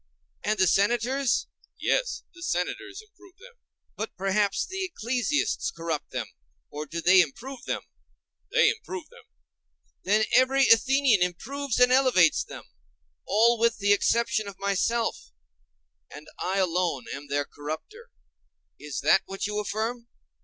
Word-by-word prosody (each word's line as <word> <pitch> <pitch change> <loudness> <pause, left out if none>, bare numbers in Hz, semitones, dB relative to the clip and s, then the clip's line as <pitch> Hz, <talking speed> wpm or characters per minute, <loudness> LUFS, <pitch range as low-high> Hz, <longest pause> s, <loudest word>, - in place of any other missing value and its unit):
And 215 +1 0
the 190 - +4
Senators? 240 +8 +1 0.3
Yes, - - 0
the 350 - -15
Senators 390 - -3
improve 390 -3 -21
them. - - -15 0.4
But 220 - -5
perhaps 195 +1 0
the 380 +1 -4
ecclesiasts 260 - -1
corrupt 165 - -4
them?—or 65 - -8
do 170 +3 -5
they 185 +2 +6
too 165 - +2
improve 260 - -10
them? - - -3 0.7
They 470 -1 +5
improve 375 -7 -7
them. 480 -1 -17 0.8
Then 215 +3 +3
every 265 +1 +4
Athenian 260 -2 +4
improves 250 +9 -2
and 250 0 +5
elevates 255 - +4
them; - - -10 0.6
all 230 +2 +4
with 235 0 +2
the 205 0 +3
exception 220 +1 +1
of 200 -2 -9
myself; 210 +4 -1 0.8
and 150 +1 -11
I 190 +2 -1
alone 175 -7 0
am 140 +1 -8
their 145 0 -1
corrupter? 155 - -8 0.7
Is 150 -2 -5
that 155 +6 +4
what 195 0 -4
you 210 +1 -2
affirm? 220 +4 -3
220 Hz, 135 wpm, -26 LUFS, 185-270 Hz, 0.8 s, they